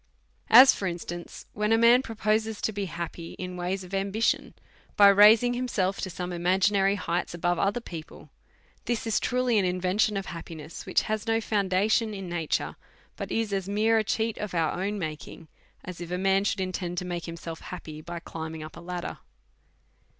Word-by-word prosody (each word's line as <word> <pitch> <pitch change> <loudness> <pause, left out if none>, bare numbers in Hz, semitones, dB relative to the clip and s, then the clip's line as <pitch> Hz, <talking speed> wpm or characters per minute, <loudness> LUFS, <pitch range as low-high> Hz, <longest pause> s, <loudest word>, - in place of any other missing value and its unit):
As 260 +1 +10
for 195 - -3
instance, 175 0 -6
when 210 +1 -1
a 225 - +5
man 235 +2 +6
proposes 220 -2 -1
to - - 0
be 200 -1 -3
happy 170 -1 -6
in 180 -1 -6
ways 180 +2 -3
of 180 +1 -12
ambition, 200 +3 0 0.4
by 200 -1 +9
raising 215 +4 +7
himself 215 -6 -1
to 190 - -3
sonie 180 0 -5
imagi 185 +3 +2
nary 195 0 +2
heights 175 -3 -2
above 175 0 0
other 200 +4 +1
people; 165 -7 -10 0.5
this 240 -2 -1
is 225 - +1
truly 250 -3 +1
an - - +1
in 180 0 -1
vention 195 +3 +1
of 195 - -3
happiness 165 -1 -8
which - - +2
has 215 +1 -3
no 225 0 +2
foundation 210 +1 +1
in 195 -2 -6
na 170 -2 -3
ture, - - -1 0.4
but - - -6
is 225 -2 -1
as 195 -1 -2
mere 220 +2 +3
a - - +1
cheat 220 +1 -1
of 210 -4 -4
our 165 -2 +2
own 200 +4 -2
making, 155 -1 -6 0.4
as 180 -1 -8
if 175 - -6
a 180 - -2
man 195 +1 +2
should 195 - 0
intend 180 -1 -3
to 180 - -2
make 175 -1 -4
himself 165 -1 -7
happy 155 -4 -8
by 170 +2 -7
climbing 160 -1 -7
up 155 - -10
a - - -9
ladder. 175 0 -5
190 Hz, 195 wpm, -27 LUFS, 175-215 Hz, 0.5 s, As